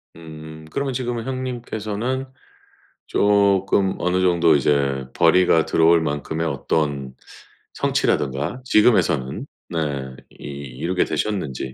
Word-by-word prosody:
음 80 -1 -11
그러면 140 -1 -2
지금은 120 -2 -3
형님께서는 125 -1 -3 0.8
조금 100 -1 +2
어느 90 +1 +1
정도 85 -3 +4
이제 70 -1 +1
벌이가 85 -1 +4
들어올 85 0 +4
만큼의 80 +2 -2
어떤 70 -2 -2 0.6
성취라든가 70 - -1
지금에서는 90 - +2 0.2
네. 70 -5 -3
이 - - -21
이루게 70 +5 -2
되셨는지. 75 -8 -3
85 Hz, 255 characters per minute, -22 LUFS, 70-105 Hz, 0.8 s, 정도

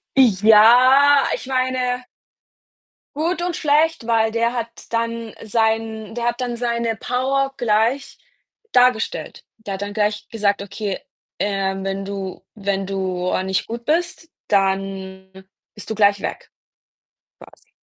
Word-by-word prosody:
Ja, 250 +5 +6
ich - - -9
meine 255 -1 -1 1.1
gut 335 +4 -1
und 350 -1 -2
schlecht, 305 -2 +2
weil 225 -1 +2
der 230 +1 0
hat 235 -2 -2 0.3
dann 230 -1 -2
sein 220 0 -1
der 235 0 -3
hat 240 +1 -1
dann 245 -1 -2
seine 235 -1 -1
Power 270 +3 -1
gleich 235 +4 0 0.6
dargestellt. 245 -3 +1
Der 215 -3 -6
hat 190 - -8
dann 205 0 -4
gleich 210 0 -1
gesagt: 205 -3 0
„Okay, 200 0 -4 0.4
ähm, 195 -1 -1
wenn 195 0 -3
du 195 -2 -6
wenn 195 -2 -2
du 185 -2 -2
a 185 - 0
nicht 190 0 -1
gut 235 +1 -6
bist, 330 +1 -1 0.2
dann 190 -1 -1 0.4
bist 210 - -11
du 220 - -2
gleich 205 -1 +3
weg", - - -6 1.0
quasi. - - -25
225 Hz, 130 wpm, -21 LUFS, 200-250 Hz, 1.1 s, Ja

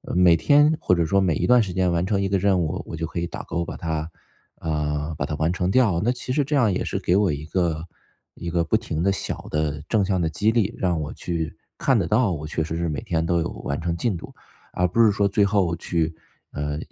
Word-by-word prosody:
每 90 -2 +6
天 145 - +4
或 - - +2
者 85 -2 +2
说 100 +5 +3
每 95 -4 +2
一 - - -1
段 125 -1 +6
时 95 -4 -5
间 90 -1 +1
完 85 +1 +1
成 100 0 0
一 100 - 0
个 100 - +2
任 95 0 +2
务， 80 -2 -2
我 - - -5
就 80 0 -3
可 85 - -4
以 85 - -1
打 85 - -6
勾 85 0 -3
把 - - -6
它 80 -1 -3 0.5
啊， 75 0 -2
把 - - -1
它 - - -4
完 80 +2 +1
成 90 0 -1
掉。 105 -8 +3
那 120 - +3
其 125 0 -5
实 145 +3 +2
这 145 +2 -1
样 120 -7 +3
也 90 - -1
是 - - -2
给 90 - +1
我 100 -4 +3
一 70 +1 -5
个 85 -1 -1 0.5
一 85 - -5
个 85 0 +1
不 85 +7 +2
停 90 -9 -4
的 100 +3 +3
小 95 - -4
的 75 -1 -1
正 105 -3 +2
向 95 -2 0
的 80 - +1
激 105 +7 +1
励， 115 -1 0
让 90 -4 0
我 75 - -4
去 85 -3 -3 0.2
看 - - +2
得 - - 0
到， 110 -1 +2
我 75 -3 -4
确 80 +1 -2
实 80 +1 -4
是 85 0 -1
每 75 -3 -3
天 80 -1 -1
都 85 0 +1
有 80 - -2
完 70 - -2
成 85 0 -2
进 105 +3 0
度， 85 - -8 0.4
而 90 - +2
不 115 +7 +3
是 110 - +6
说 100 0 +2
最 100 +1 +2
后 100 -4 +2
去， 80 -1 -1 0.4
呃， 75 0 -3
85 Hz, 280 characters per minute, -23 LUFS, 80-100 Hz, 0.5 s, 每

